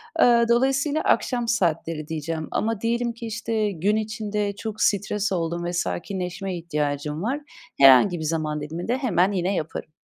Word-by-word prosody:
Aaa, 235 -1 +5
dolayısıyla 270 +5 +2
akşam 240 -2 +1
saatleri 165 -7 0
diyeceğim 160 0 -4
ama 225 -1 -1
diyelim 235 +1 0
ki, 230 0 -8
işte, 220 -1 -1
gün 195 +5 0
içinde 210 -2 -2
çok 220 0 -6
stres 205 0 +1
oldum 170 -1 -2
ve 175 - -3
sakinleşmeye 180 +1 -3
ihtiyacım 150 -1 -2
var. 270 +6 -1 0.4
Herhangi 140 +7 +7
bir - - -4
zaman 155 -1 -1
diliminde 170 - -3
hemen 200 -7 +2
yine 190 0 0
yaparım. 155 -1 -4
195 Hz, 150 wpm, -24 LUFS, 165-225 Hz, 0.4 s, Herhangi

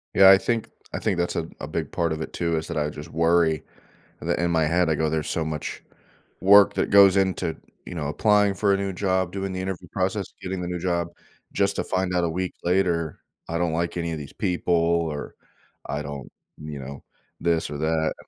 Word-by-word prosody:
Yeah. 95 0 +9
I 95 - +8
think 115 +3 -1 0.2
I - - -2
think 100 -5 0
that's 85 0 -1
a 80 - -2
a - - -5
big - - -3
part 85 -2 0
of 80 - -5
it - - -5
too, 85 -1 0
is 80 - -3
that 85 - -3
I 75 0 0
just 75 +2 -9
worry, 80 -2 +2 0.6
that - - -1
in 85 0 +1
my 80 -2 +3
head, 85 +2 +2
I 80 - +2
go 80 0 0
"There's 80 -1 -1
so 80 - -1
much 75 -1 -4 0.6
work 100 +1 +7
that - - 0
goes 100 -1 +7
into, 95 -4 +1 0.3
you 90 - -7
know, 75 -3 -2
applying 105 +5 +3
for 100 +1 +2
a - - +2
new 100 0 -2
job, 95 -1 0
doing 95 0 -3
the 95 - -3
interview 95 -1 -5
process, 95 0 -1
getting 95 0 -4
the 90 - -3
new 90 -1 -3
job, 85 -1 0 0.5
just 100 0 +1
to - - 0
find 95 -1 -1
out 90 -1 +2
a - - 0
week 90 +2 -3
later, 85 -3 +1 0.3
I 85 - -2
don't 85 -1 0
like 85 +1 -1
any 85 -1 -2
of 80 - -3
these 70 -2 -9
people 90 0 -1
or 85 -3 0 0.5
I 70 +1 -3
don't 70 -3 -7 0.3
you 75 -2 -6
know, 70 +1 -8 0.4
this 85 -2 0
or 75 - -5
that." 80 +1 0
85 Hz, 225 wpm, -24 LUFS, 80-95 Hz, 0.6 s, Yeah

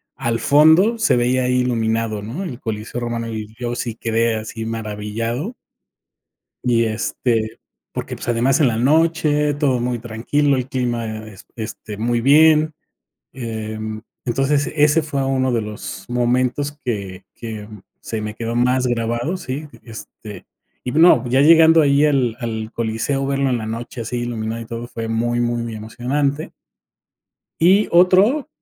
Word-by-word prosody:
al 115 0 -1
fondo 160 - +5
se 220 - +3
veía 125 +1 +2
ahí 125 0 +2
iluminado, 115 -3 -1
¿no? 130 - -5
El 130 -9 -6
Coliseo 110 +1 -5
Romano, 115 -1 -3
y 110 0 -7
yo 120 -1 -2
sí 120 -2 -4
quedé 115 0 0
así 110 +1 -5
maravillado. 115 - -4 1.1
Y 120 -2 +2
este, 110 0 -1 0.3
porque, - - -5
pues, - - -8
además 125 +6 +2
en 135 - +5
la 110 - -1
noche, 150 +2 +2
todo 135 -4 +1
muy 120 0 -1
tranquilo, 125 +5 0
el 130 0 -3
clima 115 -4 -3
es 105 -1 -13
este 110 -1 -7
muy 120 +2 0
bien, 155 +3 +5 0.6
em, 110 -3 -5 0.2
entonces, 135 +4 +1
ese 150 +1 +4
fue 140 -3 -2
uno 130 -1 +1
de 115 - +1
los 105 0 -7
momentos 125 +4 0
que 100 -7 -4
que 110 -3 -7 0.3
se 110 -1 -4
me 105 0 -5
quedó 115 0 -4
más 125 +1 +2
grabado, 120 +7 -1
¿sí? 145 0 -5 0.2
Este, 110 -3 -10 0.4
y 125 - -3
no, 155 -6 +5
ya 130 +2 +3
llegando 165 +1 +7
ahí 140 +1 +4
al 130 -6 +1
al 110 -2 -4
coliseo 115 +5 -1
verlo 140 0 0
en 125 - +1
la 110 - -5
noche 115 +2 -5
así 120 +2 -3
iluminado, 115 -1 -3
y - - -7
todo 115 +1 -6
fue 115 -2 -5
muy 120 +1 0
muy 120 -1 -1
emocionante. 135 +7 -2 1.1
Y 195 +5 +5
otro, 190 - +4
120 Hz, 150 wpm, -20 LUFS, 115-140 Hz, 1.1 s, llegando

